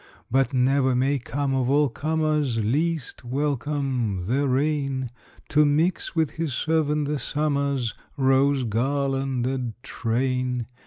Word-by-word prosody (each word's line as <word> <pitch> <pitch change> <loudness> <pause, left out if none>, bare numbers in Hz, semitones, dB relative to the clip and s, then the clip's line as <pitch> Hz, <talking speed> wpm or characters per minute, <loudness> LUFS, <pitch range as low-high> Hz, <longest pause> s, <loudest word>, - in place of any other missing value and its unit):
But 135 +2 +2
never 130 0 +2
may 135 +3 +1
come, 135 +2 -2
of 130 -1 +1
all 145 +1 +4
comers 150 -1 0
Least 145 +9 -1
welcome, 130 -6 -1
the 135 +7 +1
rain, 135 -2 0 0.4
To 150 +1 +4
mix 155 +6 +1
with 160 -3 +1
his 160 -6 -3
servant 150 -1 +1
the 150 -1 -1
summer's 140 -3 0 0.2
Rose 135 0 +3
garlanded 130 0 -1
train! 125 0 -1
135 Hz, 115 wpm, -25 LUFS, 125-145 Hz, 0.4 s, all